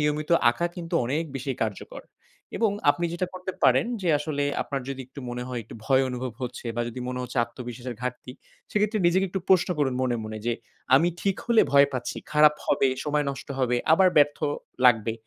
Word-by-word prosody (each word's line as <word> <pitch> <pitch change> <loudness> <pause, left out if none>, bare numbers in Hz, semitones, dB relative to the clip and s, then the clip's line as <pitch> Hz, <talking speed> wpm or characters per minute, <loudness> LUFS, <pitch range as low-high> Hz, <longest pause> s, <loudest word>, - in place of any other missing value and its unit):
নিয়মিত 150 +1 -1 0.2
আঁকা 170 +9 -1
কিন্তু 170 -2 -5
অনেক 145 +7 0
বেশি 135 +1 -4
কার্যকর 110 -3 -5 0.5
এবং 220 0 +2 0.2
আপনি 170 +4 -1
যেটা 180 +1 -1
করতে 185 +1 -5
পারেন, - - +4 0.2
যে 175 - 0
আসলে 145 -1 -2 0.2
আপনার 140 -1 -4
যদি 135 -1 -4
একটু 135 +2 -11
মনে 125 0 -4
হয় 125 -2 -3
একটু - - -12
ভয় 135 +2 +4
অনুভব 125 0 -4
হচ্ছে 125 0 -5
বা 120 - +1
যদি 120 +2 -7
মনে 125 0 -3
হচ্ছে 125 +1 -4
আত্মবিশ্বাসের 120 0 -8
ঘাটতি, 125 0 -5 0.4
সেক্ষেত্রে 210 +1 +1
নিজেকে 190 +3 +3
একটু 190 +2 -3
প্রশ্ন 185 -2 +4
করুন 135 -3 +1
মনে, 125 -2 +1
মনে 110 0 -6
যে, 120 - +2 0.4
"আমি 165 +6 +5
ঠিক 195 -1 0
হলে 235 -2 +5
ভয় 140 0 +7
পাচ্ছি। 125 -2 -4 0.2
খারাপ 150 0 +6
হবে, 135 - +3 0.2
সময় 150 -1 0
নষ্ট 140 +1 -8
হবে, 125 -2 +1 0.2
আবার 185 +3 +6
ব্যর্থ 145 0 +4 0.5
লাগবে।" 115 -2 +4
140 Hz, 195 wpm, -26 LUFS, 125-170 Hz, 0.5 s, ভয়